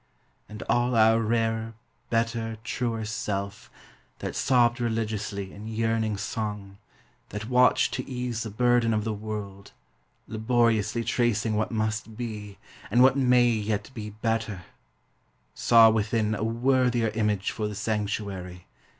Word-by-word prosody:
And 105 -2 -7
all 120 +3 +1
our 110 0 +5
rarer, 115 0 -1 0.3
better, 115 -1 -1
truer 115 -2 -2
self. 100 -2 -4 0.5
That - - -5
sobbed 120 -1 +3
religiously 105 -4 -2
in 105 +2 -9
yearning 110 -1 0
song. 105 -2 -5 0.5
That 105 +2 -6
watched 125 0 +4
to - - -4
ease 125 -3 -3
the 110 - -4
burden 120 +1 +2
of 105 - 0
the 110 0 -2
world, 105 -2 -7 0.5
Laboriously 115 -1 +1
tracing 115 -2 +1
what 110 +1 0
must 110 -1 -2
be. 105 -4 -6 0.3
And 120 +1 +5
what 130 0 +6
may 125 -2 +4
yet 110 0 -2
be 105 -3 -6
better, 110 -3 -2 0.5
— - - -42
saw 115 -2 +6
within 110 0 0
A 110 - -2
worthier 120 0 +2
image 105 -2 0
for 105 - -3
the 105 - -6
sanctuary. 100 -4 -3
110 Hz, 135 wpm, -26 LUFS, 105-115 Hz, 0.5 s, what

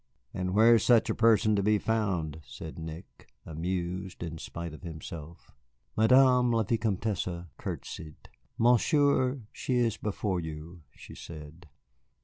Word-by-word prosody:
"And 90 +1 -2
where 115 +2 +7
is 115 - +4
such 120 -3 +4
a - - 0
person 110 -1 +4
to 100 - +2
be 105 +2 +3
found," 95 -9 -1
said 80 +1 -9
Nick, 80 +3 -10 0.2
amused 90 +3 -4
in 80 -1 -6
spite 85 0 -6
of 75 - -11
himself. 80 -1 -9 0.4
Madame 125 +2 +5
la 115 -1 +2
Vicomtesse 100 -5 -1
courtesied. 75 -2 -7 0.3
"Monsieur, 130 +2 +3
she 130 - -2
is 120 -3 +1
before 100 -3 -2
you," 80 +1 -8
she - - -12
said. 80 +1 -11
95 Hz, 130 wpm, -29 LUFS, 85-115 Hz, 0.4 s, where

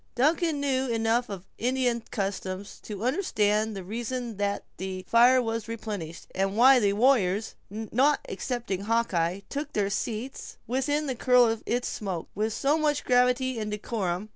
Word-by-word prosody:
Duncan 310 +4 +2
knew 265 -2 0
enough 230 +1 +1
of 195 -2 -7
Indian 245 -1 +1
customs 195 -2 -4
to 210 -1 -6
understand 220 - +1
the 195 - -5
reason 235 +2 -4
that 200 0 -1
the 185 0 -5
fire 245 +2 +6
was 225 -1 -3
replenished, 210 -8 -6
and 195 +2 -1
why 260 +2 +7
the 200 -3 +2
warriors, 215 -3 +2 0.2
not 225 +8 +1
excepting 230 -6 -3
Hawkeye, 200 -6 0
took 290 +1 -5
their 200 -1 0
seats 225 +5 -4
within 285 +5 0
the 265 - -1
curl 250 0 +5
of 225 -1 0
its 245 +1 0
smoke 190 -6 -4
with 215 +2 -1
so 285 +8 +1
much 295 -1 0
gravity 250 0 +2
and 215 -1 -3
decorum. 210 -2 -3
230 Hz, 155 wpm, -27 LUFS, 200-255 Hz, 0.2 s, why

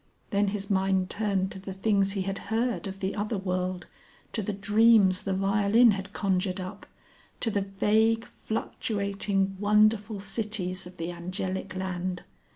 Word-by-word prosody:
Then 200 0 +2
his 200 0 -3
mind 190 -1 +1
turned 200 -3 0
to 190 - -7
the 190 0 -7
things 195 -1 +2
he 195 -2 -1
had 195 +1 -3
heard 230 -1 0
of 195 0 -7
the 190 +1 -1
other 210 +1 -1
world, 185 -1 -2 0.5
to 220 - -1
the 210 - -2
dreams 205 -1 +4
the 195 - -2
violin 200 +4 +4
had 195 0 -4
conjured 190 -1 0
up, 185 +2 -7 0.5
to 225 - +1
the 200 - +1
vague, 220 +4 +2
fluctuating, 200 -3 -2
wonderful 210 0 +3
cities 195 -3 -3
of 180 - -14
the 165 +1 -3
Angelic 185 +2 -4
Land. 185 -1 -3
195 Hz, 155 wpm, -28 LUFS, 190-210 Hz, 0.5 s, dreams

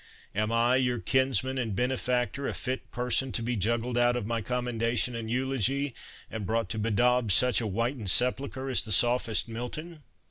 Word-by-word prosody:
Am 105 +2 -1
I, 120 +2 +3
your 125 -2 +1
kinsman 130 +1 +1
and 110 -5 -2
benefactor, 125 +2 -1
a - - -3
fit 130 0 -4
person 125 +1 +1
to 115 - +1
be 120 +1 -1
juggled 115 +4 0
out 120 0 +3
of 120 - -3
my 115 +1 -2
commendation 120 +1 -1
and 115 -1 -5
eulogy, 135 +2 0 0.4
and 110 -2 -5
brought 115 +4 -1
to 110 - -2
bedaub 115 +2 +2
such 125 +6 +4
a 110 - -2
whitened 115 +1 -1
sepulchre 130 +4 0
as 125 - +3
the 110 - -6
sophist 120 +2 +3
Milton?" 150 +8 -6
120 Hz, 175 wpm, -28 LUFS, 115-130 Hz, 0.4 s, such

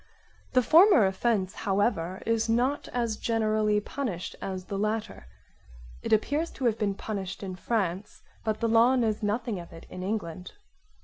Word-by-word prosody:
The 255 -1 +4
former 325 - +7
offence 190 0 0
however 190 -3 -1
is 230 0 +1
not 250 +5 +1
as 235 -3 -2
generally 215 -2 +1
punished 210 -6 -4
as 185 -1 -4
the 195 0 -4
latter. 215 - -2 0.7
It - - -5
appears 290 +9 +2
to 265 - -4
have 225 -2 +2
been 200 -2 0
punished 195 -2 -5
in 185 -2 -5
France 195 -1 -2 0.2
but 215 -1 -2
the 230 - +2
law 230 +3 +5
knows 225 -4 0
nothing 215 0 -1
of 170 - -10
it 165 - -12
in 185 - -7
England. 185 -3 -4
215 Hz, 160 wpm, -28 LUFS, 190-235 Hz, 0.7 s, former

